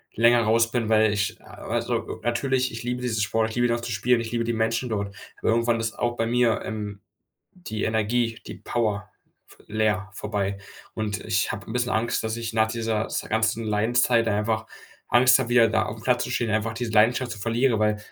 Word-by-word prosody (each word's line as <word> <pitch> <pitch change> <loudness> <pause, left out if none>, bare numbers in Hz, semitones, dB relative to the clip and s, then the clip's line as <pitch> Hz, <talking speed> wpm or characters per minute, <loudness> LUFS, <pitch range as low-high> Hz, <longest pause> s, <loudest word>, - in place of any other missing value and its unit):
länger 120 +1 +5
raus 115 +1 +3
bin, 120 -3 0
weil 110 -1 +4
ich 105 +2 -2
also, - - -3
natürlich, 130 +2 0
ich 115 +1 -7
liebe 125 +1 -3
diesen 115 -3 -1
Sport, 110 +2 +1
ich - - -8
liebe 120 0 +3
ihn 120 - +1
auch 120 - -2
zu 120 - -5
spielen, 115 +3 +2
ich 115 0 -6
liebe 115 -1 0
die 120 - -1
Menschen 115 +3 0
dort, 100 -2 -3 0.3
aber - - 0
irgendwann 115 0 +2
ist 115 -1 -2
auch 120 0 0
bei 115 - +1
mir, 120 -1 +2
ähm, 105 -2 -5 0.5
die 155 - -5
Energie, 115 +1 0
die - - -7
Power 105 -4 -2 0.4
v - - -19
leer, 105 -3 0
vorbei. 100 -2 -2 0.4
Und 105 -1 -3
ich 110 -2 0
habe 100 -1 -7
'n - - -7
bisschen 125 0 0
Angst, 115 +1 0
dass 110 0 -2
ich 115 -1 -4
nach 110 -1 +3
dieser 110 -1 -1
s - - -2
ganzen 110 +1 +1
Leidenszeit, 115 +2 +2
dann 100 - +1
einfach 110 +1 -1 0.4
Angst 125 +2 +6
habe, 125 -2 -2
wieder 120 -2 +5
da 110 - +1
aufm 110 +1 -7
Platz 125 -1 +2
zu - - -6
stehen, 120 -2 -1
einfach 110 +1 0
diese 115 0 -4
Leidenschaft 120 +4 +3
zu 110 - -6
verlieren, 115 +2 +1
weil 105 0 +1
115 Hz, 215 wpm, -25 LUFS, 110-120 Hz, 0.5 s, Angst